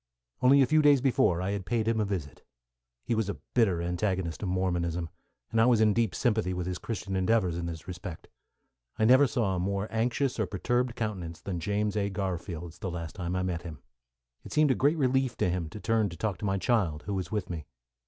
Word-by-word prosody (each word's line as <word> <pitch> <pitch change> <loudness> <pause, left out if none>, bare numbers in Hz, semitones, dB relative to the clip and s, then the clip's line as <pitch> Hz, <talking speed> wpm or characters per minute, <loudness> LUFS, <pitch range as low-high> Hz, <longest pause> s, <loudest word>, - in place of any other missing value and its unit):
Only 135 +2 +6
a - - +4
few 155 +5 +4
days 145 -2 +6
before, 125 -9 +2
I 95 - -1
had 100 -1 -3
paid 110 +2 -1
him 115 -1 +2
a 105 - +2
visit. 85 -9 -5 0.6
He - - -1
was 110 -3 0
a 100 - -3 0.2
bitter 95 -8 +2
antagonist 90 -1 -1
of 100 - -2
Mormonism, 90 -2 -1 0.4
and 115 - +3
I 115 - +5
was 120 -3 +4
in 110 -1 +4
deep 115 -3 +1
sympathy 110 -6 +1
with 90 -1 -3
his 90 0 -3
Christian 100 -3 -4
endeavours 95 -2 +2
in 85 0 -3
this 80 0 -7
respect. 90 -2 -7 0.7
I 110 - +3
never 130 +4 +7
saw 115 -6 0
a - - -1
more 100 +3 -1
anxious 120 +3 0
or 110 - +1
perturbed 120 +5 0
countenance 95 -8 -4
than 90 -3 -4
James 105 +2 -1
A. 100 -1 0
Garfield's, 90 -3 -4
the 95 - -3
last 85 -2 -5
time 90 -2 -3
I 95 - 0
met 90 -2 -2
him. 85 -3 -8 0.7
It - - -11
seemed 150 -2 +4
a - - +5
great 145 +5 +2
relief 130 -3 +1
to 90 - +1
him 85 -3 -2
to 105 - -8
turn 110 -1 +1
to 85 - -9
talk 100 0 -2
to - - -4
my 95 -1 +1
child, 95 -8 +1
who 100 - -4
was 95 -3 -3
with 105 -5 -2
me. 80 -4 -6
100 Hz, 225 wpm, -29 LUFS, 90-115 Hz, 0.7 s, never